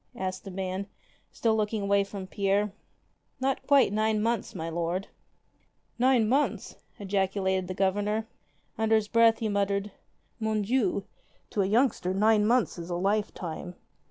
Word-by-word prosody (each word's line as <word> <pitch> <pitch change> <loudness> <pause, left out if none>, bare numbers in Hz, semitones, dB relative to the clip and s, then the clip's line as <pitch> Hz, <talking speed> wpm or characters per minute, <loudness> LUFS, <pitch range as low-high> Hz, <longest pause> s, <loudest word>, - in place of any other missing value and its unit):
asked 185 -3 -4
the - - -6
man, 190 +1 -4 0.4
still 225 -2 +1
looking 215 -1 -1
away 200 0 +3
from 195 -1 -7
Pierre. 200 +1 0 0.7
"Not 265 0 0
quite 275 -7 +5
nine 215 0 +1
months, 230 -1 -1
my 165 -2 -4
lord." 170 +3 -2 0.9
"Nine 250 -3 +4
months!" 275 +6 0 0.2
ejaculated 190 -1 0
the 185 - -5
Governor. 205 +3 0 0.5
Under 220 0 +3
his 215 -1 +1
breath 230 0 +5
he 225 - -2
muttered, 200 0 0 0.5
"Mon 220 -1 0
Dieu! 205 -4 +1 0.5
to 205 - +1
a 190 - +1
youngster 210 -4 +1
nine 210 +1 +4
months 240 -6 +2
is 170 +1 -7
a 175 - -2
lifetime." 185 -3 -2
205 Hz, 145 wpm, -28 LUFS, 190-220 Hz, 0.9 s, quite